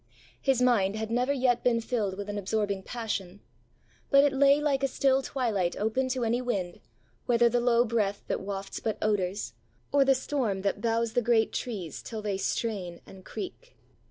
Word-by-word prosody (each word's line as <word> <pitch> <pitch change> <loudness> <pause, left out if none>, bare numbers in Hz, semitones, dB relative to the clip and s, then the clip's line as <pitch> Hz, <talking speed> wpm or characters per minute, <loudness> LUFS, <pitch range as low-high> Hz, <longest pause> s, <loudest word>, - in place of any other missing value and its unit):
His 265 -3 +2
mind 210 -5 +3
had 220 0 -4
never 250 +3 +1
yet 250 -3 +1
been 235 -2 +3
filled 220 -5 -2
with 205 0 -5
an 205 0 -3
absorbing 200 0 -1
passion; 205 -4 -4 0.7
but 275 -1 +6
it 285 -2 +3
lay 280 +1 +5
like 290 -2 +1
a 275 - +2
still 270 0 +2
twilight 220 -11 -1
open 240 +5 0
to 255 -1 -1
any 235 +2 +1
wind, 195 -8 -3 0.5
whether 240 -1 +4
the 240 +1 +1
low 240 0 +4
breath 210 -3 -1
that - - -2
wafts 195 0 -5
but 220 - -2
odours, 205 -2 -1 0.4
or 285 -1 +5
the 270 0 +4
storm 250 -8 -1
that 200 0 -1
bows 230 0 0
the 245 - +2
great 230 -1 +2
trees 190 - -4
till 220 -2 -6
they 205 -2 -1
strain 190 -4 -2
and 190 -1 -13
creak. - - -8
230 Hz, 185 wpm, -28 LUFS, 200-255 Hz, 0.7 s, but